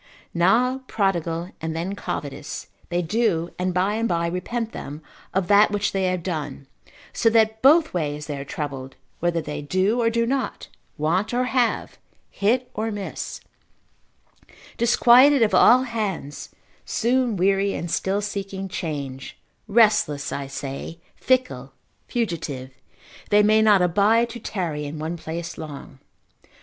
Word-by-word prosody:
Now 235 +10 +3
prodigal, 175 -3 -1
and 160 0 -3
then 175 +4 -3
covetous, 145 -6 -5 0.2
they 175 0 0
do, 175 -3 0
and 185 0 0
by 185 +3 +1
and 230 +1 -1
by 170 -1 0
repent 220 +7 -3
them 150 - -8 0.3
of 190 -2 0
that 205 +1 +6
which 205 -1 -1
they 190 -1 0
have 180 -2 -1
done, 150 -6 -4 0.5
so 225 - +3
that 220 -1 +2
both 310 +4 +5
ways 150 -3 -2
they 150 - -4
are - - -4
troubled, 135 -2 -6 0.2
whether 170 -1 0
they 150 -1 -5
do 185 +10 +1
or 230 - +3
do 230 0 +1
not, 265 +1 -2 0.3
want 180 +10 0
or 250 - +2
have, 250 -2 0 0.3
hit 245 +5 0
or 220 +2 -2
miss, 205 -2 -5 1.3
disquieted 245 +3 +6
of 215 - +1
all 250 +2 +6
hands, 205 - -4 0.3
soon 240 -2 0
weary, 195 +2 +2
and 170 - -4
still 195 +2 0
seeking 195 -1 -4
change, 140 -7 -5 0.3
restless, 210 -10 +3
I 140 -1 -4
say, 140 +4 -6 0.2
fickle, 135 - 0 0.3
fugitive, 160 - -3 0.6
they 210 0 +5
may 215 +1 +4
not 210 -4 +5
abide 215 +7 +3
to 240 - -7
tarry 170 -9 -3
in 145 +2 -6
one 160 +3 -3
place 165 +1 -6
long. 145 -3 -9
190 Hz, 140 wpm, -23 LUFS, 160-225 Hz, 1.3 s, that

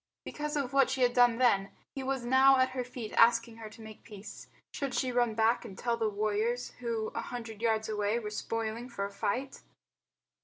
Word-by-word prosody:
Because 300 0 -4
of 275 -2 -2
what 275 -1 +4
she 265 - -2
had 245 0 +3
done 245 -1 +5
then, 200 -6 +3 0.2
he 270 - -5
was 265 -2 -2
now 265 +2 +6
at 260 0 +3
her 255 -1 -3
feet 245 -3 -8
asking 230 0 +4
her 220 -1 -8
to 225 +1 -13
make 220 -1 -11
peace. 205 -1 -11 0.3
Should 275 -3 -3
she 260 -2 0
run 240 -2 +1
back 225 +1 +2
and 200 -5 -10
tell 235 -1 0
the 225 -2 0
warriors, 215 +4 -1
who 230 -3 -2
a 230 - -4
hundred 230 -3 -7
yards 220 -1 +1
away 210 0 0
were 210 -3 -5
spoiling 225 +2 -4
for 200 -5 -3
a 200 - -7
fight? 250 +8 -3
230 Hz, 205 wpm, -30 LUFS, 220-250 Hz, 0.3 s, now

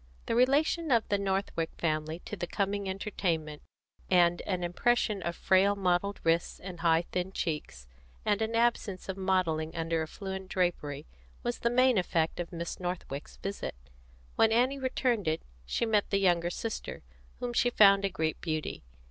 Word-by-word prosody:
The - - -1
relation 290 +7 +3
of 230 -2 +3
the 200 - +2
Northwick 195 -4 -1
family 155 +1 -1
to - - -6
the 175 -3 -4
coming 200 +1 -1
entertainment, 170 -6 -2 0.5
and 175 -1 +4
an 185 -3 -1
impression 210 +3 +1
of 170 -1 -3
frail 195 +3 +3
mottled 195 +1 0
wrists 165 +1 +1
and 180 -2 -8
high 165 0 +3
thin 180 +1 -2
cheeks, 150 - -4 0.4
and 205 +1 +2
an 220 +1 -1
absence 230 -5 0
of 190 - -2
modelling 180 -5 0
under 165 -1 0
affluent 190 +3 -6
drapery, 175 -7 -1 0.4
was 240 0 -2
the 235 - +1
main 255 -2 +4
effect 165 -2 0
of 175 - -4
Miss 170 -1 -5
Northwick's 175 -6 -5
visit. 195 - -4 0.6
When 225 0 +5
Annie 255 +4 +2
returned 250 -6 0
it, 155 0 0 0.2
she 235 - 0
met 215 -2 +2
the 200 - +2
younger 175 -3 +2
sister, 225 +5 -5 0.4
whom 245 -1 -3
she 245 +1 +3
found 200 -4 +6
a 195 - +2
great 160 -3 -2
beauty. 155 - -3
190 Hz, 165 wpm, -30 LUFS, 170-210 Hz, 0.6 s, found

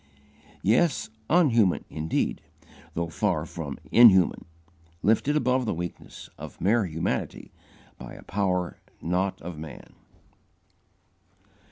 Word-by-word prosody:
Yes, 115 - +2 0.2
_un_human 120 - +3
indeed, 80 +1 -2 0.5
though 85 0 -2
far 90 -5 0
from 75 -5 -6 0.2
_in_human, 100 -7 +6 0.6
lifted 115 +8 +2
above 130 -3 +1
the - - 0
weakness 85 +1 -7
of - - -9
mere 105 +4 +2
humanity 80 0 -3 0.5
by - - -9
a - - -12
power 90 -3 -1 0.2
not 90 +3 -1
of 85 -2 -7
man. 80 -3 -10
95 Hz, 100 wpm, -26 LUFS, 85-115 Hz, 0.6 s, in_human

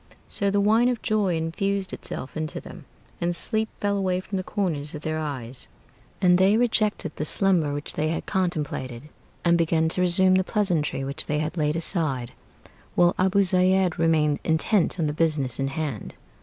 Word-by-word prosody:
So 200 - 0
the 200 +1 +1
wine 220 +4 +3
of 245 -3 -3
joy 205 -5 +1
infused 190 +4 -2
itself 130 - -7
into 155 -1 -3
them, - - -12 0.4
And 175 0 0
sleep 220 +4 0
flew 205 0 0
away 185 -2 0
from 195 +1 -5
the 185 - -3
corners 160 -9 -2
of 150 - -8
their 155 0 -2
eyes, 130 -5 -6 0.5
And 180 -1 +4
they 195 +3 +4
rejected 215 -8 0
the - - -3
slumber 170 -2 +3
which 145 +1 -4
they 155 - -1
had 165 - -3
contemplated, 150 - -3 0.4
And 170 0 +4
began 160 -1 +2
to 180 - -1
resume 185 +1 +4
the 185 0 +3
pleasantry 180 -9 0
which 140 +1 -4
they 150 - 0
had 155 +2 -2
laid 150 -2 0
aside, 155 -8 -1 0.6
While 175 0 +4
Abu 190 +2 +3
Zeid 185 -1 +3
remained 155 -3 +2
intent 170 +3 +1
on 160 - +1
the 150 - -1
business 150 -6 0
in 135 - 0
hand. 135 -6 -4
170 Hz, 180 wpm, -25 LUFS, 150-190 Hz, 0.6 s, And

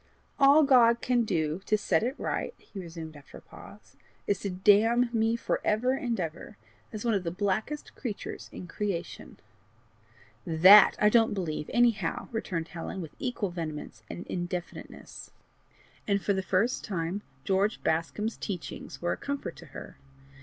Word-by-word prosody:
"All 280 +3 +7
God 240 -4 +5
can 245 -2 +1
do 160 -2 -1
to 215 - +3
set 180 -5 +1
it 250 +4 -1
right," - - -3
he 200 - -11
resumed, 165 -3 -8
after 145 -1 -13
a - - -13
pause, - - -15 0.3
"is 200 -2 0
to 200 - -3
damn 215 +6 +4
me 225 0 +2
for 235 - -2
ever 225 +5 +2
and 240 -4 -2
ever, 165 -3 -5 0.3
as 215 +1 -6
one 230 - +2
of 195 -3 0
the 170 - -2
blackest 205 - -2
creatures 225 -7 -6
in - - -8
creation." 180 -1 -5 1.1
"THAT 185 +5 +8
I 210 - +5
don't 225 -1 +3
believe, 155 -5 -3
anyhow!" 240 -2 +1
returned 180 -8 -3
Helen 175 +3 -6
with 165 -4 -7
equal 235 -7 -2
vehemence 155 -9 -6
and 85 +1 -7
indefiniteness. 175 0 -6 0.8
And 200 -1 +2
for 200 - 0
the 190 - -1
first 195 +7 0
time, 180 +1 -3 0.2
George 195 +2 +1
Bascombe's 190 +7 -1
teachings 180 -2 -6
were 175 - +1
a - - -6
comfort 280 0 -4
to - - -12
her. - - -10
200 Hz, 160 wpm, -28 LUFS, 175-230 Hz, 1.1 s, THAT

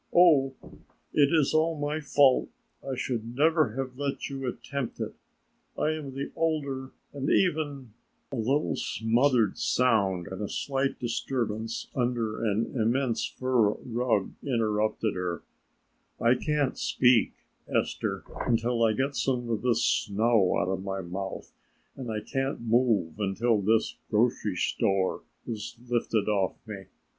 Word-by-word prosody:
Oh, 145 -7 +6 0.6
it 145 -1 +4
is 155 -4 +3
all 160 0 +2
my 145 +2 -1
fault. 140 -3 +4 0.3
I 135 -1 -3
should 120 -2 -3
never 155 -5 +3
have 130 -1 -4
let 140 -1 -3
you 135 -1 -4
attempt 130 +1 -4
it; - - -3 0.6
I 155 - +1
am 145 -4 -5
the 140 - -4
older 140 -5 -1 0.2
and 140 0 -2
even 145 - +1 0.2
" - - -45
A - - -2
little 135 +7 +1
smothered 115 -1 +1
sound 100 -8 +2
and 95 +2 -6
a 105 - -3
slight 135 0 -1
disturbance 115 -2 -2
under 120 -3 -1
an 110 0 0
immense 120 +1 +1
fur 125 -5 +1
rug 120 -4 -1
interrupted 110 -4 0
her: 90 -2 -3 0.8
"I 120 +1 +4
can't 145 +1 0
speak, 125 -3 +3 0.3
Esther, - - -1 0.2
until 115 0 +1
I 110 -1 +4
get 135 +4 -1
some 120 0 -1
of 110 - -1
this 125 -2 +2
snow 105 -1 +2
out 90 - 0
of 95 0 -2
my 95 0 -3
mouth 95 +2 -6 0.4
and 130 -3 -6
I 105 -1 -2
can't 135 +2 -2
move 115 -7 +1
until 105 +2 +1
this 110 +3 +1
grocery 110 -3 +1
store 95 +2 0 0.2
is 115 -1 -5
lifted 115 -3 0
off 100 -3 +1
me. 100 -3 -7
120 Hz, 140 wpm, -28 LUFS, 110-135 Hz, 0.8 s, Oh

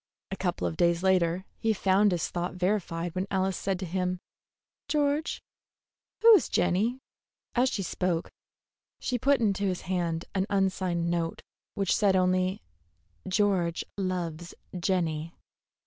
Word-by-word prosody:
A - - -1
couple 90 - -2
of 85 -2 -2
days 170 0 +2
later 185 -1 +2
he 225 -1 +2
found 200 +1 +3
his 175 -3 -1
thought 175 +1 -3
verified 180 -3 -1
when 185 +2 -2
Alice 190 -1 0
said 195 -1 -1
to 190 - -5
him: 180 +1 -1 0.7
"George, 295 +1 0 0.8
who 460 0 +10
is 400 - +4
Jenny?" 195 +8 +1 0.6
As 255 +1 +3
she 200 - -2
spoke, 180 -2 -1 0.7
she 250 -1 -1
put 280 +3 +3
into 205 -3 +1
his 185 -2 -1
hand 170 -2 -2
an 190 0 0
unsigned 185 -3 0
note 165 -1 -2 0.3
which 195 -2 +1
said 200 -3 +3
only, 185 0 +1 0.6
"George 185 -4 +1
loves 175 -3 -3 0.2
Jenny." 170 -3 -1
185 Hz, 135 wpm, -28 LUFS, 175-200 Hz, 0.8 s, who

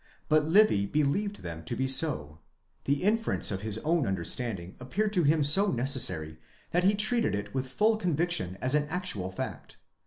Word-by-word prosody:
But 155 -1 +4
Livy 160 - +4
believed 150 - -1
them 80 -1 -7
to - - -3
be 130 - -1
so. 130 - 0 0.5
The 140 +3 0
inference 225 - +1
of 95 -1 -3
his 110 0 -2
own 160 -4 +1
understanding 95 0 -2
appeared 205 +12 -2
to 180 - +3
him 155 0 +3
so 190 +8 +4
neces 130 0 0
sary, 80 -7 -2 0.3
that 175 +1 +1
he 200 +2 +4
treated 220 - +1
it 100 - -5
with 130 -1 -2
full 215 - +2
conviction 170 - -1
as 130 +1 0
an 150 0 +2
actual 160 - -2
fact. 95 - -7
145 Hz, 180 wpm, -28 LUFS, -, 0.5 s, But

